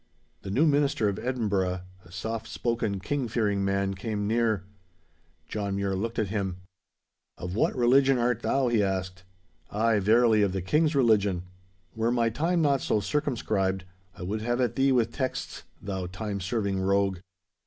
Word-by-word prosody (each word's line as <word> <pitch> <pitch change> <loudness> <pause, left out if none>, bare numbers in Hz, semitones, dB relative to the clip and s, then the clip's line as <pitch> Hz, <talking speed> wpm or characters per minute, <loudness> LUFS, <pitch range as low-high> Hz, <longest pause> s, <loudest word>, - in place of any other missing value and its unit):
The - - -7
new 130 +11 +3
minister 145 -7 +2
of 100 - -3
Edinburgh, 100 -7 -1 0.2
a 85 - -17
soft 110 +4 -4
spoken, 115 -4 -1
King 140 +4 -2
fearing 105 -4 0
man, 100 0 0
came 105 +1 -3
near. 110 -3 +1 0.8
John 100 -2 -3
Mure 100 -1 -1
looked 115 +4 -3
at 110 -3 0
him. 95 -4 -2 0.8
'Of 90 +1 -5
what - - +1
religion 130 +2 +4
art 120 -1 +1
thou?' 135 0 +1
he 115 -3 +3
asked. 95 -2 -2 0.5
'Ay, 110 0 +2
verily, 110 +2 +4
of 100 -2 +2
the 95 - -2
King's 150 - +2
religion. 105 -8 +3 0.5
Were 115 +1 +1
my 115 -2 +2
time 165 +7 +1
not 140 -2 +2
so 105 - +1
circumscribed, 105 -7 -1 0.3
I 95 - -7
would 105 +4 -3
have 120 +2 -1
at 125 -2 +1
thee 135 0 +3
with 120 -3 +2
texts, 130 -2 -4
thou 95 -2 -4
time 100 +2 -4
serving 100 0 -1
rogue. 95 -1 +1
110 Hz, 165 wpm, -27 LUFS, 95-120 Hz, 0.8 s, religion